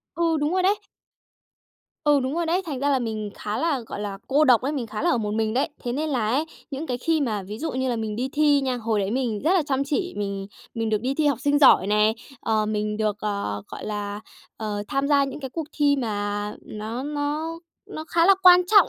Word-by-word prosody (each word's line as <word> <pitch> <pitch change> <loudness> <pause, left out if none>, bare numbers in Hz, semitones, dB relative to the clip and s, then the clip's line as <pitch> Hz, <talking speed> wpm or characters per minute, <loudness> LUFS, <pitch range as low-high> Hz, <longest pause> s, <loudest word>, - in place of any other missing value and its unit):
Ừ, 335 -1 +2
đúng 295 +3 0
rồi 370 0 +2
đấy. 400 +3 +3 1.3
Ừ, 290 -2 +4
đúng 260 +3 -2
rồi 340 -1 0
đấy. 355 +3 +1
Thành 280 -5 -3
ra 285 - +1
là 275 - +3
mình 220 -3 -3
khá 210 +1 -4
là, 295 -2 +1
gọi 225 -3 -7
là, 200 -1 -4
cô 290 +3 +4
độc 250 -5 +6
ấy, 275 +3 -1
mình 265 -6 -3
khá 215 -1 -5
là - - +3
ở 245 - +2
một 210 -2 -2
mình 220 0 0
đấy. 265 +5 +1 0.2
Thế 240 - -1
nên 305 +4 -1
là 230 -5 0
ấy, 275 +7 +1 0.3
những 280 +4 -4
cái 250 -3 -2
khi 320 +4 +1
mà 215 -7 -1
ví 210 +3 -7
dụ 320 +3 -3
như 260 0 -1
là 240 - 0
mình 215 -1 -3
đi 255 +3 -1
thi 295 -1 +4
nha, 260 -2 -1
hồi 225 -3 0
đấy 195 +1 -1
mình 235 -4 -1
rất 335 - +4
là 370 - +4
chăm 275 -1 0
chỉ, 350 +6 -2
mình 200 -1 -3 0.3
mình 225 -1 -1
được 215 -1 +1
đi 260 +4 -1
thi 305 +1 +1
học 280 -5 +2
sinh 285 +2 +2
giỏi 265 -9 +7
nè, 210 +1 +3 0.3
ờ, 215 -1 +1
mình 210 0 -1
được, 215 -1 0
ờ, 200 - -2
gọi - - -8
là, 205 -1 -4 0.4
ờ, 210 -2 -3
tham 275 +1 0
gia 280 -1 +4
những 275 +2 -6
cái 265 -2 -5
cuộc 315 +2 -4
thi 290 -1 +3
mà 205 -4 -2
nó 220 +4 -5
nó 295 +3 -2 0.3
nó 310 - -6
khá 335 0 +3
là 390 - +8
quan 360 -1 +8
trọng 405 -2 +6
255 Hz, 250 wpm, -24 LUFS, 215-295 Hz, 1.3 s, là